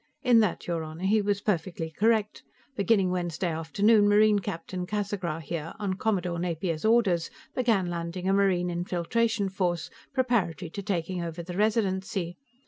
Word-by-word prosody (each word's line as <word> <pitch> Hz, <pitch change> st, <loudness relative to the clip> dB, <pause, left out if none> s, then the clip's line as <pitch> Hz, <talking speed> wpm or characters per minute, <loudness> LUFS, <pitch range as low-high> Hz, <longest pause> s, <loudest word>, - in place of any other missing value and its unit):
In 245 Hz, -3 st, +6 dB
that, 215 Hz, -5 st, 0 dB
your 170 Hz, -2 st, -1 dB
Honor, 160 Hz, +3 st, -8 dB
he 210 Hz, +3 st, +3 dB
was 200 Hz, 0 st, 0 dB
perfectly 170 Hz, -4 st, -2 dB
correct; 215 Hz, +3 st, +1 dB, 0.3 s
beginning 200 Hz, -3 st, +2 dB
Wednesday 175 Hz, -1 st, -1 dB
afternoon, 205 Hz, +7 st, +3 dB
Marine 210 Hz, 0 st, +5 dB
Captain 180 Hz, 0 st, -5 dB
Casagra, 195 Hz, -6 st, -2 dB
here, 165 Hz, 0 st, -5 dB
on 205 Hz, -3 st, -1 dB
Commodore 185 Hz, -4 st, -1 dB
Napier's 170 Hz, -2 st, -2 dB
orders, 215 Hz, -7 st, +3 dB, 0.2 s
began 225 Hz, -7 st, +2 dB
landing 175 Hz, +1 st, -4 dB
a 195 Hz, -, +3 dB
Marine 185 Hz, -3 st, +2 dB
infiltration 195 Hz, +5 st, 0 dB
force, 175 Hz, -3 st, -2 dB, 0.2 s
preparatory 230 Hz, -, 0 dB
to 200 Hz, -, -5 dB
taking 185 Hz, -2 st, -2 dB
over 170 Hz, 0 st, -5 dB
the 175 Hz, +1 st, -7 dB
Residency. 190 Hz, -4 st, 0 dB
185 Hz, 145 wpm, -27 LUFS, 170-210 Hz, 0.3 s, In